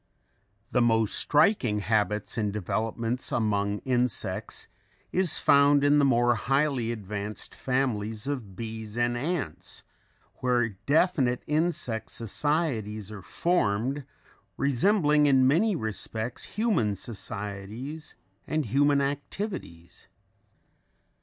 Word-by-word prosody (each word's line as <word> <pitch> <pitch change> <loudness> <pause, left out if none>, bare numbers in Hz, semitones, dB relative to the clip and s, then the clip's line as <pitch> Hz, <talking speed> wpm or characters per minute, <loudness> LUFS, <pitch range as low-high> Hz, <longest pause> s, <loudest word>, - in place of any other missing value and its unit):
The 125 - +3
most 115 -2 +2
striking 145 - +3
habits 105 -1 0
and 105 -3 0
developments 110 +5 -2
among 105 -2 0
insects 125 -3 -1 0.4
is 185 -3 +1
found 140 0 +5
in 145 +1 +5
the 140 - +4
more 120 -2 +4
highly 135 0 0
advanced 105 -1 -5
families 115 -4 -1
of 125 -9 -4
bees 110 0 -6
and 120 0 +1
ants 145 - -4 0.5
where 125 -2 +1
definite 130 - +1
insect 150 -7 -1
societies 115 - -2
are 105 -2 -8
formed, 135 - 0 0.5
resembling 150 - +3
in 135 -2 +5
many 185 +9 +3
respects 110 0 -4
human 205 - 0
societies 105 - -6 0.3
and 155 -2 0
human 145 +1 +3
activities. 140 - -5
120 Hz, 100 wpm, -27 LUFS, 105-145 Hz, 0.5 s, found